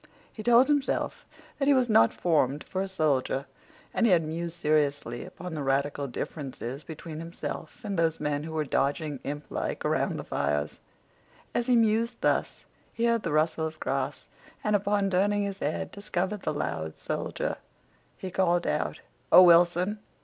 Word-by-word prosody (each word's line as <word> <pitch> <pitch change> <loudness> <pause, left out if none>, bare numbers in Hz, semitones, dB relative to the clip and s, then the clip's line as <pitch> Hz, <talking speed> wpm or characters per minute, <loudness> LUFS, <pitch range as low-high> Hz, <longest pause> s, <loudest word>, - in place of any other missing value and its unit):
He 220 - -7
told 240 +3 +6
himself 290 -2 0 0.3
that 275 - +1
he 285 - +6
was 255 -2 +3
not 115 - +5
formed 150 -4 +1
for 190 - -3
a 195 - -2
soldier. 145 -6 0 0.5
And 235 - +3
he 185 -5 +6
mused 165 +1 -4
seriously 145 -6 0
upon 180 0 -8
the 155 - -3
radical 140 +1 0
differences 135 0 -5
between 155 +1 -8
himself 165 +3 -6
and 200 -4 -2
those 165 -1 +1
men 150 -1 -1
who 160 +1 -6
were 155 -1 0
dodging 145 +1 0
implike 145 +1 -4
around - - +1
the - - -5
fires. 75 +1 -1 0.7
As 240 +1 0
he 250 - +4
mused 230 +1 +2
thus - - 0 0.3
he 230 - -1
heard 235 -1 +2
the 170 - -3
rustle 160 +1 +1
of 155 0 -10
grass, 135 +1 -2 0.4
and, 210 0 +2
upon 200 0 +1
turning 205 +2 +2
his 200 -1 -4
head, 150 - -2
discovered 200 0 -3
the - - -1
loud 80 - -3
soldier. - - -3 0.6
He 185 - -6
called 175 -2 +2
out, - - -1 0.3
"Oh, 185 - +10
Wilson!" 175 +4 +5
165 Hz, 165 wpm, -28 LUFS, 145-200 Hz, 0.7 s, Oh